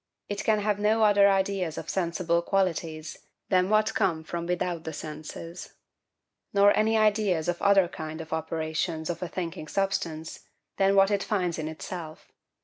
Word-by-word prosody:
It 205 Hz, 0 st, -3 dB
can 220 Hz, -1 st, +3 dB
have 205 Hz, -1 st, 0 dB
no 215 Hz, +2 st, +3 dB
other 205 Hz, -1 st, +6 dB
ideas 190 Hz, -4 st, 0 dB
of -, -, -6 dB
sensible 170 Hz, -1 st, 0 dB
qualities 165 Hz, -4 st, -1 dB, 0.3 s
than 185 Hz, -1 st, +3 dB
what 215 Hz, +1 st, +3 dB
come 170 Hz, -6 st, 0 dB
from 170 Hz, +1 st, -5 dB
without 180 Hz, 0 st, 0 dB
[*dropped 175 Hz, -, -3 dB
word] 160 Hz, -, -16 dB
the 160 Hz, -, -4 dB
senses; 155 Hz, +3 st, -8 dB, 0.8 s
nor 200 Hz, 0 st, +5 dB
any 220 Hz, +1 st, +3 dB
ideas 210 Hz, -6 st, +2 dB
of 175 Hz, 0 st, -1 dB
other 200 Hz, -2 st, +5 dB
kind 160 Hz, -1 st, -7 dB
of 160 Hz, -1 st, -6 dB
operations 160 Hz, +1 st, -2 dB
of 170 Hz, -, -7 dB
a 180 Hz, -, -2 dB
thinking 170 Hz, -2 st, -5 dB
substance, 175 Hz, -4 st, -2 dB, 0.4 s
than 195 Hz, 0 st, +3 dB
what 195 Hz, +1 st, +5 dB
it 200 Hz, -1 st, +1 dB
finds 180 Hz, -6 st, -1 dB
in 155 Hz, -, -3 dB
itself. 160 Hz, 0 st, -8 dB
180 Hz, 170 wpm, -27 LUFS, 160-200 Hz, 0.8 s, other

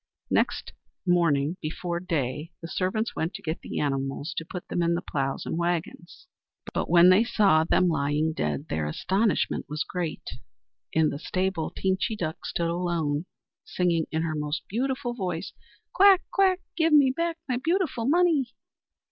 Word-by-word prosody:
Next -, -, 0 dB, 0.3 s
morning, 170 Hz, -3 st, +2 dB
before 170 Hz, +2 st, -3 dB
day, 150 Hz, -3 st, -2 dB
the 165 Hz, -, -7 dB
servants 190 Hz, +6 st, -1 dB
went 165 Hz, +3 st, -2 dB
to -, -, -8 dB
get 160 Hz, 0 st, -3 dB
the -, -, -5 dB
animals 135 Hz, +2 st, -2 dB
to -, -, -1 dB
put 175 Hz, +2 st, -8 dB
them -, -, -2 dB
to 170 Hz, -, +2 dB
the 175 Hz, -, -2 dB
ploughs 135 Hz, -1 st, -2 dB
and 165 Hz, -, -2 dB
waggons; 175 Hz, -, -3 dB, 0.5 s
but -, -, -2 dB
when 175 Hz, +1 st, +7 dB
they 185 Hz, +4 st, +6 dB
saw 200 Hz, -9 st, +4 dB
them 180 Hz, +2 st, +3 dB
lying 150 Hz, 0 st, +1 dB
dead 75 Hz, -, -2 dB
their 80 Hz, -1 st, -2 dB
astonishment 195 Hz, -, 0 dB
was 150 Hz, +1 st, -2 dB
great. 175 Hz, -3 st, -4 dB, 0.6 s
In 160 Hz, -1 st, +3 dB
the 140 Hz, -, -5 dB
stable 185 Hz, -1 st, -1 dB
Teenchy 190 Hz, +4 st, -1 dB
Duck 160 Hz, -5 st, -4 dB
stood 170 Hz, -1 st, -1 dB
alone, 170 Hz, -2 st, -1 dB, 0.4 s
singing 170 Hz, -3 st, 0 dB
in 160 Hz, 0 st, 0 dB
her 160 Hz, -1 st, -1 dB
most 150 Hz, 0 st, -3 dB
beautiful 255 Hz, +3 st, -2 dB
voice: 185 Hz, -5 st, -4 dB, 0.4 s
"Quack! 390 Hz, -1 st, +6 dB
quack! 380 Hz, -2 st, +3 dB
Give 325 Hz, -1 st, +2 dB
me 280 Hz, -3 st, +6 dB
back 335 Hz, +1 st, -1 dB
my 250 Hz, -2 st, 0 dB
beautiful 325 Hz, -9 st, 0 dB
money!" 305 Hz, -6 st, +2 dB
175 Hz, 160 wpm, -26 LUFS, 155-225 Hz, 0.6 s, when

